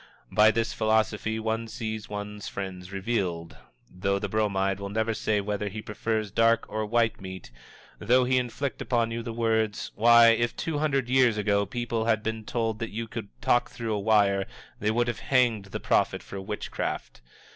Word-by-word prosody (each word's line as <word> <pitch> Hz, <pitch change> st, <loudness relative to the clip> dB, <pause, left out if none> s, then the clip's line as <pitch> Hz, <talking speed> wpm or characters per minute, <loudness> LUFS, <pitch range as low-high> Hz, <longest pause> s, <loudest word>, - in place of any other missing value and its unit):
By 105 Hz, +1 st, +6 dB
this 110 Hz, +1 st, 0 dB
philosophy 110 Hz, 0 st, +1 dB
one 110 Hz, +1 st, -2 dB
sees 110 Hz, -2 st, -5 dB
one's 105 Hz, 0 st, -6 dB
friends 95 Hz, -1 st, -6 dB
revealed. 95 Hz, -5 st, -2 dB, 0.3 s
Though 100 Hz, +2 st, -1 dB
the 100 Hz, +1 st, -3 dB
Bromide 100 Hz, -2 st, 0 dB
will 100 Hz, 0 st, -5 dB
never 110 Hz, +2 st, 0 dB
say 110 Hz, -1 st, 0 dB
whether 105 Hz, 0 st, -2 dB
he 105 Hz, +2 st, -6 dB
prefers 110 Hz, 0 st, -2 dB
dark 115 Hz, +2 st, +3 dB
or 110 Hz, 0 st, -3 dB
white 115 Hz, -1 st, +1 dB
meat; 95 Hz, -7 st, -8 dB, 0.5 s
though 125 Hz, +4 st, +4 dB
he 130 Hz, +1 st, +3 dB
inflict 125 Hz, +3 st, -3 dB
upon 115 Hz, -2 st, 0 dB
you 115 Hz, 0 st, -3 dB
the 115 Hz, -, -5 dB
words, 110 Hz, -2 st, 0 dB
"Why, 115 Hz, +1 st, +7 dB
if 120 Hz, +1 st, +2 dB
two 160 Hz, -3 st, -2 dB
hundred 140 Hz, -5 st, +1 dB
years 125 Hz, -3 st, +4 dB
ago 100 Hz, -1 st, +1 dB
people 120 Hz, 0 st, -2 dB
had 110 Hz, -2 st, +1 dB
been 110 Hz, -1 st, -3 dB
told 115 Hz, -2 st, -1 dB
that 115 Hz, -1 st, -3 dB
you 115 Hz, +2 st, -4 dB
could 110 Hz, -1 st, -6 dB, 0.2 s
talk 120 Hz, -, +3 dB
through 115 Hz, -2 st, -4 dB
a 105 Hz, -, -1 dB
wire 100 Hz, -2 st, +3 dB, 0.3 s
they 105 Hz, -, 0 dB
would 120 Hz, +2 st, +1 dB
have 120 Hz, -3 st, -2 dB
hanged 120 Hz, -6 st, +2 dB
the 95 Hz, -, -6 dB
prophet -, -, +1 dB
for 100 Hz, -, -7 dB
witchcraft!" 105 Hz, -, -4 dB
110 Hz, 180 wpm, -27 LUFS, 105-115 Hz, 0.5 s, Why